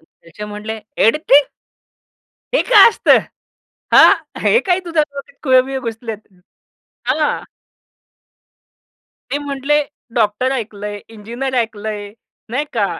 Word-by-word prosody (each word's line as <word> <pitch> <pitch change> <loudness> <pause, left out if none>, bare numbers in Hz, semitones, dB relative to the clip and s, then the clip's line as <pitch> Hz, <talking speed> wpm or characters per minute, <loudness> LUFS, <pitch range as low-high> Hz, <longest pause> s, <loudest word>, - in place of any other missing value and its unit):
त्याचे 165 +5 -13
म्हटले, 210 +1 -6 0.3
"एडिटिंग?" 285 +2 +4 1.1
"हे - - +4
काय 430 -4 +7
असतं? - - +4 0.8
हां. - - +8 0.3
हे 470 - +4
काय 360 0 +2
तुझ्या 330 -2 +1
डोक्यात 285 +10 -9
खुळं-बिळं 260 0 +2
घुसलेत." 225 -1 -5 0.9
हां. 295 +4 0 1.9
ते 285 - -1
म्हटले, 285 +1 0 0.3
"डॉक्टर 230 +3 +1
ऐकलंय, 210 -4 -5
इंजिनिअर 235 +5 -6
ऐकलंय." 215 -3 -3 0.4
नाही 265 +5 -1
का? 210 -4 +1
250 Hz, 100 wpm, -17 LUFS, 215-285 Hz, 1.9 s, हां